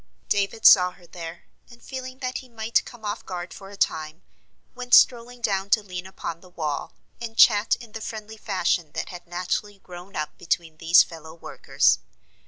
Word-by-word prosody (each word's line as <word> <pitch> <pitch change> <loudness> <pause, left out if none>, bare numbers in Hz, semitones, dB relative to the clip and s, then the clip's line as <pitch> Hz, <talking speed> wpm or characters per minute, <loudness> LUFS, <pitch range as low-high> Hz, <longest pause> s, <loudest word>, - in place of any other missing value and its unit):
] - - -43
David 205 +2 0
saw 180 -2 +9
her 180 - -19
there, 170 -1 -9 0.3
and, 240 -1 -15
feeling 255 -1 -7
that 255 0 -2
he 255 - -14
might 225 0 0
come 235 -3 -11
off 205 +1 -3
guard 180 -1 -6
for 195 - -11
a 200 - -11
time, 155 -3 -1 0.5
went 250 0 +3
strolling 245 0 +4
down 195 -3 0
to 215 +1 +3
lean 185 -2 -6
upon 170 -3 -6
the 185 - -16
wall, 155 -4 -4 0.3
and 225 -1 -6
chat 210 -1 +6
in 235 -3 -13
the 225 - -7
friendly 220 0 -7
fashion 175 -6 -1
that - - -4
had 180 -1 -10
naturally 180 +4 -3
grown 180 +1 -12
up 150 0 -3
between 165 -2 -2
these 165 +2 +6
fellow 160 -1 -11
workers. 170 - +1
195 Hz, 190 wpm, -25 LUFS, 175-225 Hz, 0.5 s, saw